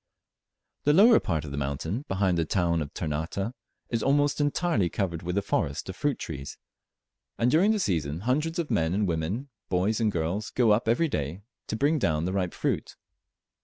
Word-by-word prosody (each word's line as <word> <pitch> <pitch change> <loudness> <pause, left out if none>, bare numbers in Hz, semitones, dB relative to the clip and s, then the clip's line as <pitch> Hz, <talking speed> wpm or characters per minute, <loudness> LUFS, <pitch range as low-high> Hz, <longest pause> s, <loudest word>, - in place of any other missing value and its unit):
The 145 - +5
lower 220 +7 +7
part 80 -4 -2
of 70 - -7
the 70 - -4
mountain, 75 - -3
behind 95 -1 +1
the 85 - +2
town 85 0 +1
of 75 - -5
Ternate, 80 +8 -3 0.4
is 115 -2 0
almost 145 +3 +2
entirely 145 - +1
covered 85 -5 -2
with 90 +2 -3
a 100 - +1
forest 70 -2 -1
of 95 - -5
fruit 145 +8 0
trees, 70 -4 -6 0.8
and 120 +1 +2
during 175 +8 +4
the 220 - +3
season 80 - -1
hundreds 150 - 0
of 165 -6 -2
men 85 -4 +1
and 105 0 +1
women, 90 - -2 0.2
boys 95 +5 +1
and 110 -2 +2
girls, 90 +5 -2
go 120 -4 +3
up 110 +3 +2
every 120 +9 +3
day 80 - -3 0.2
to - - -2
bring 145 +6 +2
down 80 - +1
the 95 - -1
ripe 90 -3 -1
fruit. - - -2
100 Hz, 190 wpm, -27 LUFS, 80-130 Hz, 0.8 s, lower